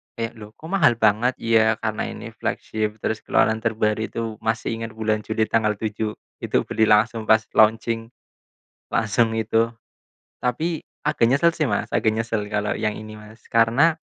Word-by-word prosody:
kayak, 115 -1 -5
"Loh 105 +1 -12
kok 160 +3 -10
mahal 165 -11 +4
banget?" 110 +3 +2
"Ya, 110 -1 +3
karena 110 -1 -1
ini - - -8
flagship, 110 -1 -3
terus 110 - -1
keluaran 110 0 +2
terbaru," 110 -1 0
itu 115 +3 -4 0.2
masih 110 +1 -1
inget 115 -1 -6
bulan 110 -1 0
Juli 110 +1 -1
tanggal 105 -1 +1
7, 105 +1 -3 0.2
itu - - 0
beli 110 0 +1
langsung 110 +1 +2
pas 110 0 +5
launching. 115 +1 +3 0.8
Langsung 115 +1 +1
itu. 115 +1 +1 0.8
Tapi 155 +7 -1 0.2
agak - - +2
nyesel 170 +5 +4
sih 155 - +1
Mas, - - -1
agak 110 - +2
nyesel 115 -1 -2
kalau 105 0 0
yang 105 -1 -1
ini 110 0 -9
Mas, 110 +1 -15
karena 120 +8 +4
110 Hz, 160 wpm, -23 LUFS, 110-115 Hz, 0.8 s, pas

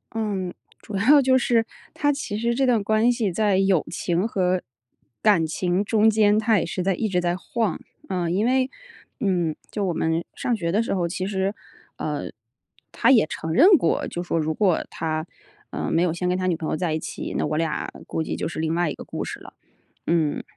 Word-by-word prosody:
嗯， 200 -5 -2 0.3
主 210 - -8
要 270 +9 +6
就 260 -1 +4
是， 235 -2 +2 0.3
它 290 -1 +1
其 235 -7 -4
实 235 +2 0
这 265 +3 +1
段 235 -4 +3
关 220 +3 +3
系 230 -6 0
在 205 +1 +2
友 195 -4 +3
情 175 +3 -1
和 185 -4 0 0.6
感 200 -7 +4
情 180 +4 0
中 215 +1 +3
间， 215 -1 +4
它 220 -1 +3
也 - - -1
是 180 +2 -3
在 195 +1 +2
一 220 - -1
直 185 -3 0
在 175 0 0
晃。 210 0 -2 0.3
呃， 180 -3 -1
因 190 +6 +1
为， 260 +1 +2 0.5
嗯， 180 -8 0 0.2
就 210 - -2
我 180 - 0
们 160 +1 0
上 245 - 0
学 170 -6 -2
的 210 +5 +2
时 230 - -2
候， 175 -3 0
其 185 +2 -3
实， 195 +1 -1 0.4
呃， - - -3 0.6
他 - - +2
也 240 -8 +6
承 160 0 -5
认 290 - +7
过， 165 - 0
就 175 - -4
说 175 -1 -2
如 160 0 0
果 185 -1 +1
他， 155 -1 -2 0.5
呃， - - -3
没 165 - +2
有 175 -3 +1
先 180 +1 -2
跟 180 - +1
他 185 - -2
女 180 -2 +2
朋 160 -1 -4
友 - - 0
在 170 -3 -1
一 160 - -1
起， - - -6
那 - - 0
我 155 - -1
俩 160 -2 -1 0.2
估 - - -3
计 160 - -3
就 - - -3
是 165 - -6
另 160 +1 0
外 175 -3 +1
一 - - -3
个 - - -9
故 - - -5
事 - - -6
了。 - - -13 0.5
嗯， 160 -3 +1
190 Hz, 235 characters per minute, -24 LUFS, 170-220 Hz, 0.6 s, 认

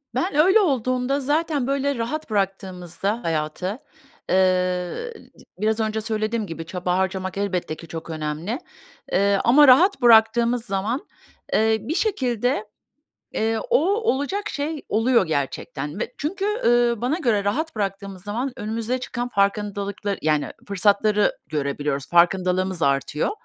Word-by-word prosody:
Ben 345 +8 -1
öyle 375 +8 +6
olduğumda 255 - +1
zaten 290 -1 0
böyle 280 0 0
rahat 260 +7 -3
bıraktığımızda 195 0 -2
hayatı, 165 - -2 0.5
eee, - - +3 1.0
d - - -18 0.2
biraz 215 +2 +1
önce 220 0 -1
söylediğim 215 0 -2
gibi 165 -1 -6
çaba 180 +1 -2
harcamak 190 0 -2
elbette 185 -5 -2
ki 165 - -12
çok 165 0 -7
önemli, 160 - -3 0.5
eee, 200 +1 +3
ama 280 +4 +6
rahat 300 +5 +6
bıraktığımız 235 +1 +5
zaman, 215 +6 -2 0.5
eee, 220 0 +3
bir 315 - -3
şekilde, 250 - 0 0.7
eee, 225 +1 0
o - - +5 0.2
olacak 405 - -1
şey 300 +1 -3
oluyor 225 -2 +3
gerçekten 150 +2 -3
ve 245 - -4
çünkü, 385 +7 -3 0.2
ııı, 240 -1 +3
bana 260 +8 0
göre 220 - +1
rahat 295 +9 -1
bıraktığımız 195 -2 -4
zaman 240 +6 -3
önümüze 225 +4 -2
çıkan 245 0 -4
farkındalıkla 200 -1 -1
yani 150 -1 +1 0.2
fırsatları 205 +1 +2 0.2
görebiliyoruz, 140 -1 -2
farkındalığımız 180 +1 +2
artıyor. 140 +2 +1
215 Hz, 130 wpm, -23 LUFS, 185-255 Hz, 1.0 s, öyle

